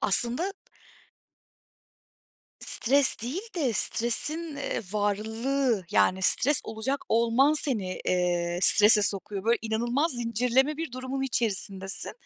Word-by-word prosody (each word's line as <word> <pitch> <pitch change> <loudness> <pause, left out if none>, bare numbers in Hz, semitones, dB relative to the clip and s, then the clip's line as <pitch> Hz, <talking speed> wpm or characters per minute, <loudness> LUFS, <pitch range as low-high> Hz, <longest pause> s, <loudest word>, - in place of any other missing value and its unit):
Aslında 240 - +1 2.1
Stres 275 +3 +3
değil 260 +10 -4 0.2
de 275 -8 -2
stresin, 290 +9 +1
eee, 280 - -5
varlığı 220 +2 -3
yani 190 -2 0
stres 280 +9 +5
olacak 225 +6 -5
olman 235 +5 +1
seni, 225 -12 -2
eee, 175 -1 -2
strese 210 0 +8
sokuyor. 200 0 -3
Böyle, 230 +1 0
inanılmaz 240 +8 -2
zincirleme 245 +5 -1
bir 325 -5 -7
durumun 260 +1 -6
içerisindesin. 200 -6 -3
235 Hz, 105 wpm, -25 LUFS, 205-270 Hz, 2.1 s, strese